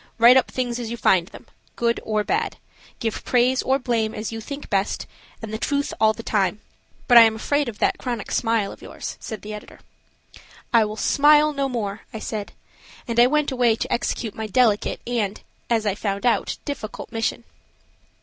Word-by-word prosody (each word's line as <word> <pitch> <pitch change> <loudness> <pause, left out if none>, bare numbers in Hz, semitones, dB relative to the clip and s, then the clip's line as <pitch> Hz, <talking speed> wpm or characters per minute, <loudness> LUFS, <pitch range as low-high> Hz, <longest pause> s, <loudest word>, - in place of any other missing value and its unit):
Write 240 +2 +8
up 260 - +3
things 245 -2 -2
as 235 -2 -4
you 235 - -4
find 180 -6 +3
them, - - -13 0.3
good 235 0 +1
or 215 -1 -1
bad; 420 - -1 0.4
give 225 -2 -3
praise 255 +1 +2
or 265 +1 +2
blame 235 -4 -1
as 215 +1 -4
you 225 0 -5
think 280 +5 -7
best, 195 -1 -1 0.4
and 220 -1 -6
the 220 - -3
truth 285 +3 -1
all 220 0 +6
the 230 +1 -8
time. 200 -2 0 0.5
But 245 -2 +9
I - - +11
am 225 -1 +5
afraid 285 +4 0
of 215 - -9
that - - +1
chronic 240 -5 -4
smile 225 -4 +1
of - - -13
yours," - - -7
said 220 - -7
the 215 +1 -6
editor. 210 - -10 0.9
"I 230 -2 +6
will 210 +1 -6
smile 300 +4 +4
no 275 -1 -1
more," 215 -4 -3
I - - -6
said, 215 -1 -5 0.5
and 235 0 0
I 240 - +8
went 300 +1 +1
away 245 -3 +3
to - - -3
execute 230 -2 -2
my 220 0 -5
delicate 215 -1 +2
and, 220 -4 -1 0.3
as 225 -2 +1
I 205 - +1
found 200 +1 -3
out, 240 - +1
difficult 260 -7 -6
mission. 225 +1 -2
230 Hz, 195 wpm, -23 LUFS, 215-250 Hz, 0.9 s, I